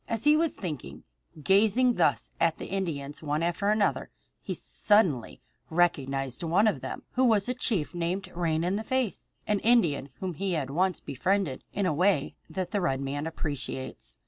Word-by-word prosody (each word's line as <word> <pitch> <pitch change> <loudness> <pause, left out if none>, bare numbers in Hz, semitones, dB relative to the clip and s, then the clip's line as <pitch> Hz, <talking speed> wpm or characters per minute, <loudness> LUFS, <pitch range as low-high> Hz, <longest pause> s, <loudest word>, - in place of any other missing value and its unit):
As 230 -1 -1
he 295 +1 +6
was 325 0 +1
thinking, 145 - -6 0.4
gazing 220 - +4
thus - - +1
at 165 -1 +2
the - - -6
Indians 155 -7 -3
one 150 +1 -1
after 175 +4 0
another, 210 -1 +1 0.3
he - - -4
suddenly 185 - +1 0.3
recognized 135 -6 0
one 175 +5 +3
of 215 - +1
them - - -6
who 255 - +1
was 220 -4 +4
a 250 - 0
chief 215 - 0
named 175 +3 -2
Rain 165 -2 0
in 185 +3 0
the 220 - -3
Face, 255 -2 -2
an 210 -1 +1
Indian 170 - +2
whom 185 -2 -3
he 190 +4 -2
had 140 -5 -2
once 180 +4 +1
befriended 180 0 -1
in 200 - -1
a 180 - +2
way 175 -2 +2 0.2
that 185 -2 -4
the 205 -3 0
red 135 -7 0
man 140 +3 -3
appreciates. 135 - -5
175 Hz, 175 wpm, -28 LUFS, 150-205 Hz, 0.4 s, he